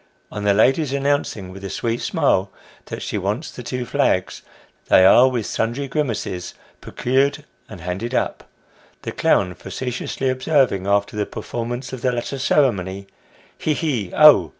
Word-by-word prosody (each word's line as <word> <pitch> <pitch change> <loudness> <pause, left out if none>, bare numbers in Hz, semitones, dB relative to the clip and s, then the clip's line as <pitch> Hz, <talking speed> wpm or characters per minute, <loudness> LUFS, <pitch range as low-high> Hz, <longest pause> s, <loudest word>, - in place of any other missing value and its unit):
On 105 0 -5
the 100 - +4
lady's 135 +6 +3
announcing 140 -9 -1
with 95 +1 -11
a 95 - -4
sweet 115 +4 -2
smile 95 +1 +1 0.3
that - - -6
she - - -3
wants - - -3
the - - -9
two 125 -1 -4
flags, - - 0 0.5
they 95 - +6
are 125 +7 +7
with 120 -4 -2
sundry 120 +5 -2
grimaces, 115 - -3 0.3
procured 140 +4 0 0.2
and 100 -6 -10
handed 95 +8 -4
up; - - -2 0.5
the - - -4
clown 90 -2 +2
facetiously 130 +5 -4
observing 130 -7 +1
after 100 +1 +1
the 105 -1 -1
performance 120 +2 -5
of 130 - -6
the 125 - +1
latter 125 +3 -4
ceremony 100 -9 +1 0.3
" - - -30
He, 155 - 0
he, 125 - -2
oh 150 - +7
120 Hz, 155 wpm, -21 LUFS, 100-135 Hz, 0.5 s, are